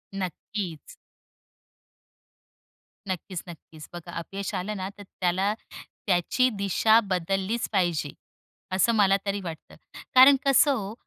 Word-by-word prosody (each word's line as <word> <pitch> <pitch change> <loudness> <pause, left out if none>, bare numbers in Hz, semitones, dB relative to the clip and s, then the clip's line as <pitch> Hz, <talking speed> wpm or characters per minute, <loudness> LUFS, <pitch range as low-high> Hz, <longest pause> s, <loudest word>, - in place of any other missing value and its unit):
नक्कीच. 185 - -5 2.1
नक्कीच, 185 -1 -4
नक्कीच. 160 -2 -12
बघा 175 0 -8
अपयश 195 +4 -6
आलं 210 +3 -3
ना, 190 0 -4
तर 205 - -10 0.2
त्याला 185 +3 +1 0.5
त्याची 195 +8 +2
दिशा 215 +3 +4
बदललीच 195 +5 -1
पाहिजे, 175 -7 0 0.6
असं 190 +5 +3
मला 195 -2 +4
तरी 200 0 -2
वाटतं. 165 -3 -9 0.4
कारण 260 +2 +9
कसं 275 +1 +5
हो 205 -3 -5
195 Hz, 110 wpm, -26 LUFS, 175-210 Hz, 2.1 s, कारण